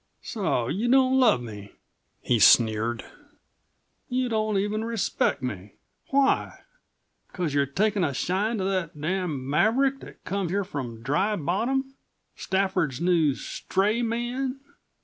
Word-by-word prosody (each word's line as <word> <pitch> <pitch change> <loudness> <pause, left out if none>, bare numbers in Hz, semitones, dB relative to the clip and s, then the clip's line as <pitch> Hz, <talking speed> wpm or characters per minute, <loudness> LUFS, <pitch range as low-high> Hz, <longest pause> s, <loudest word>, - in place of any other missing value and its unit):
"So 185 - -1
you 205 - -1
don't 260 0 +4
love 220 - +4
me?" 105 -3 -9 0.5
he 120 -2 +2
sneered. 115 +1 +4 1.0
"You 255 0 0
don't 215 -2 0
even 210 +2 -1
respect 225 - -1
me. 105 -5 -6 0.3
Why? 275 0 +1 0.7
Because 175 -6 -3
you've 140 -1 0
taken 205 -1 +2
a 145 - +1
shine 195 - -1
to 190 - -2
that 185 -6 -2
damned 170 -3 -2
maverick 225 - +2
that - - -13
come 195 -2 -2
here 200 +3 0
from 125 - -6
Dry 190 - +1
Bottom 240 - -1 0.4
Stafford's 190 -8 -1
new 165 -5 +2
stray 205 - -1
man!" 240 +3 -2
190 Hz, 130 wpm, -26 LUFS, 140-225 Hz, 1.0 s, don't